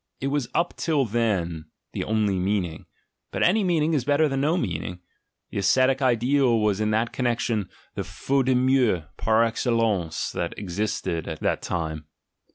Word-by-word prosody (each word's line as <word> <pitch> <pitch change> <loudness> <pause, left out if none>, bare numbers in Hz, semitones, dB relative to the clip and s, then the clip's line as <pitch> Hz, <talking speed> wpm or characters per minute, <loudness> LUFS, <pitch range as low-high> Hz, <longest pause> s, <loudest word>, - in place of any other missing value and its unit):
It 135 - -1
was 140 -4 -1
up 170 +1 +1
till 150 -5 +1
then 95 -8 -1 0.3
the - - -2
only 105 -3 +1
meaning; 90 -4 -2 0.4
but - - -1
any 205 +5 +4
meaning 165 -3 +2
is 140 -5 +1
better 145 +3 +3
than 135 -1 -1
no 155 +5 +2
meaning; 90 - -3 0.5
the - - -2
ascetic 130 +7 +3
ideal 125 0 +3
was 105 -1 +1
in 105 - +1
that 110 +2 0
connection 115 -5 -1 0.2
the - - -3
"jaute 135 -1 -1
de 130 - +4
mieux" 125 -8 +3
par 110 +1 +3
excellence 115 -7 0
that - - -3
existed 95 -3 -2
at 80 - -5
that - - 0
time. 80 -3 -3
115 Hz, 165 wpm, -25 LUFS, 95-135 Hz, 0.5 s, any